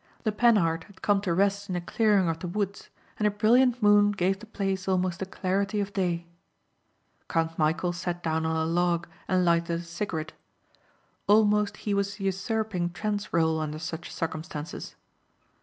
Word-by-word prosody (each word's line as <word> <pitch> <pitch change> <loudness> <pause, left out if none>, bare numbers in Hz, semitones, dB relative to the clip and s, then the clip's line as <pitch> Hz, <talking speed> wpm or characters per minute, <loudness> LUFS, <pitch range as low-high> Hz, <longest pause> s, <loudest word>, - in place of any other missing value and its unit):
The 215 - +1
Panhard 200 -8 +3
had 200 - -19
come 205 -1 +3
to 195 -4 -1
rest 200 +3 +1
in 185 - -2
a - - 0
clearing 200 +1 +2
of 165 0 -1
the 180 - -5
woods 200 +2 -3 0.3
and 210 - +3
a - - +4
brilliant 240 +4 +3
moon 205 0 +6
gave 195 -1 0
the 225 - -12
place 195 -3 -2
almost 185 -2 0
the 190 - -3
clarity 195 +2 -1
of 200 0 -3
day. 175 -3 -1 1.0
Count 165 0 0
Michæl 165 +3 +1
sat 175 0 -4
down 160 0 0
on 160 0 0
a 160 0 +1
log 170 +1 +1 0.2
and 185 -1 +2
lighted 170 0 +1
a - - -10
cigarette. 170 -2 -4 0.9
Almost 210 0 +4
he 205 - +1
was 200 +1 -1
usurping 195 -1 -1
Trent's 205 +3 -2
rôle 160 -1 +1
under 155 0 -3
such 160 +1 -6
circumstances. 160 -1 -5
185 Hz, 170 wpm, -27 LUFS, 170-205 Hz, 1.0 s, moon